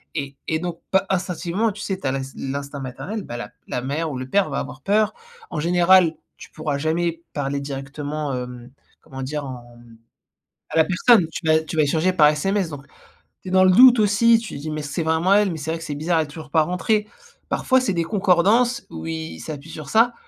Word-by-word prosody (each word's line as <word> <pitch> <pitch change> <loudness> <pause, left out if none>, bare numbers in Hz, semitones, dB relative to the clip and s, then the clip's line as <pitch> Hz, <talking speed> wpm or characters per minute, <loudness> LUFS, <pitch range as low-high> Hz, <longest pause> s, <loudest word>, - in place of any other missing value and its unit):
et 140 -2 -4
et 160 - 0
donc 175 -1 -5
par, 190 - +4
instinctivement 185 +3 -1
tu 210 - -11
sais, 195 -2 -2
tu - - -10
as 130 - +1
l'ins 135 - -2
l'instinct 140 +1 -5
maternel, 185 - -5
bah, 120 - -7
la - - -6 0.2
la 125 - -2
mère 150 +5 -2
ou 130 - -5
le 130 +1 -6
père 195 0 +2
va 135 - -2
avoir 130 +1 -7
peur. 210 +5 +2 0.4
En - - -3
général, 175 0 +4 0.2
tu - - -13
pourras 155 -2 -3
jamais 165 +2 -1
parler 140 -1 -2
directement 145 +2 -5
hem, 125 -1 -7 0.3
comment 135 0 -8
dire 150 +2 -3
en 120 -2 -9
mmh, 115 -1 -17 0.7
à - - -2
la 160 - +6
personne 185 0 +4
tu 160 - -6
vas 155 0 +5
tu 160 - -6
vas - - +5
échanger 160 +5 +1
par 155 -5 +6
SMS, 190 +5 0
donc, 140 -2 -9 0.6
tu 185 - -9
es - - -5
dans 185 0 +5
le 185 - +6
doute 250 +2 +8
aussi, 215 +3 +4
tu 225 - -7
dis: 155 +2 -5
«Mais 155 0 -3
c'est 145 +3 -3
vraiment 160 +4 +3
elle? 205 -1 +4
Mais 160 - -5
c'est 155 +2 -4
vrai 165 - -3
que 165 - -9
c'est 150 - -4
bizarre, 165 +3 +1
elle 155 - +1
est - - -12
toujours 150 +1 -10
pas 160 +1 +4
rentrée». 210 +6 0 0.4
Parfois 260 -1 +2
c'est 250 -7 -1
des 170 -1 0
concordances 205 +6 +2
où 80 0 -7
ils 80 0 -5
s'appuient 150 - -8
sur 155 -3 -8
ça 230 +5 +4
160 Hz, 230 wpm, -22 LUFS, 140-190 Hz, 0.7 s, doute